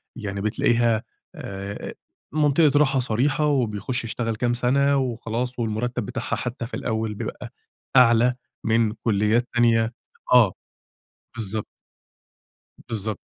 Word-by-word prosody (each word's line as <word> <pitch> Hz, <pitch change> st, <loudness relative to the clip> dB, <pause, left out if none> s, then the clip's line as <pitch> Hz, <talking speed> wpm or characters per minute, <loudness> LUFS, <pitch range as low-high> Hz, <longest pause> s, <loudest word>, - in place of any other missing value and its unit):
يعني 100 Hz, -4 st, -4 dB
بتلاقيها 115 Hz, +1 st, +2 dB, 0.3 s
آآ، 100 Hz, +1 st, -6 dB, 0.4 s
منطقة 150 Hz, -1 st, +4 dB
راحة 135 Hz, -2 st, +3 dB
صريحة، 130 Hz, +5 st, +1 dB
وبيخش 120 Hz, -3 st, 0 dB
يشتغل 115 Hz, 0 st, -2 dB
كام 120 Hz, +2 st, 0 dB
سنة 140 Hz, +3 st, +2 dB
وخلاص، 125 Hz, -1 st, -2 dB
والمرتب 115 Hz, +2 st, -2 dB
بتاعها 125 Hz, -1 st, -3 dB
حتّى 120 Hz, -1 st, -4 dB
في 120 Hz, -, -12 dB
الأوّل 110 Hz, -2 st, -2 dB
بيبقى -, -, -6 dB, 0.4 s
أعلى 125 Hz, 0 st, +5 dB, 0.3 s
من 110 Hz, -1 st, +2 dB
كليات 110 Hz, +2 st, +1 dB
تانية، 115 Hz, -1 st, +3 dB, 0.4 s
آه، 115 Hz, -7 st, +6 dB, 0.8 s
بالضبط. 110 Hz, -1 st, -3 dB, 1.2 s
بالضبط. 110 Hz, -1 st, -3 dB
115 Hz, 110 wpm, -24 LUFS, 110-125 Hz, 1.2 s, آه